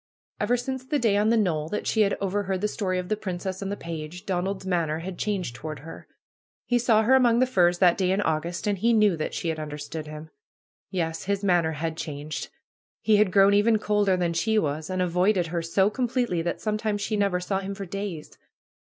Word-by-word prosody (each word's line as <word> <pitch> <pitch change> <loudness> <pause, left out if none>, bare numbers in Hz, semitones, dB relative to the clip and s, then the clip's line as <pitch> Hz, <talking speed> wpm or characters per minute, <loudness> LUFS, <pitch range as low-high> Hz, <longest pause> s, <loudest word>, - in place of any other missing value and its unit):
Ever 245 - +2
since 260 +1 -4
the 295 +3 -1
day 225 -6 +2
on 210 +2 +3
the 230 - +4
knoll 160 -7 0
that 210 - -3
she 220 - +2
had 200 -1 +2
over 200 +1 -1
heard 190 -1 -2
the 210 - +2
story 190 -3 -2
of 180 0 -3
the 215 - 0
princess 190 -2 -4
and 195 0 -3
the 205 - -3
page, 165 +1 -7
Donald's 190 +1 -2
manner 170 -4 0
had 175 +2 -6
changed 190 - -2
toward 150 +1 -7
her. 165 +2 -10 0.6
He 245 0 +2
saw 225 -2 +3
her 245 +4 +4
among 245 -3 +5
the 255 - +4
firs 180 -8 +3
that 180 0 +4
day 185 -1 +2
in 190 +2 +1
August, 165 -2 -1
and 205 -2 0
he 235 +4 +3
knew 210 -4 +4
that 155 - -3
she 170 - -2
had 160 -1 -2
understood 150 +1 -6
him. 155 +1 -9 0.6
Yes 165 -2 -2
I - - -17
His 200 0 0
manner 175 -4 +2
had 160 +1 -3
changed! 150 -2 -5 0.6
He 215 0 +4
had 205 -3 +3
grown 195 +1 +5
even 215 +2 +4
colder 205 -3 +1
than 175 -2 0
she 220 +6 +1
was, 155 -3 -1
and 185 0 0
avoided 180 +1 +2
her 170 - 0
so 190 +5 +2
completely 245 -7 0
that 170 +1 -3
sometimes 215 -1 -1
she 215 - -1
never 200 -3 +1
saw 190 +2 -1
him 195 0 -5
for 195 0 -6
days. 190 -4 -6
190 Hz, 225 wpm, -26 LUFS, 165-210 Hz, 0.6 s, among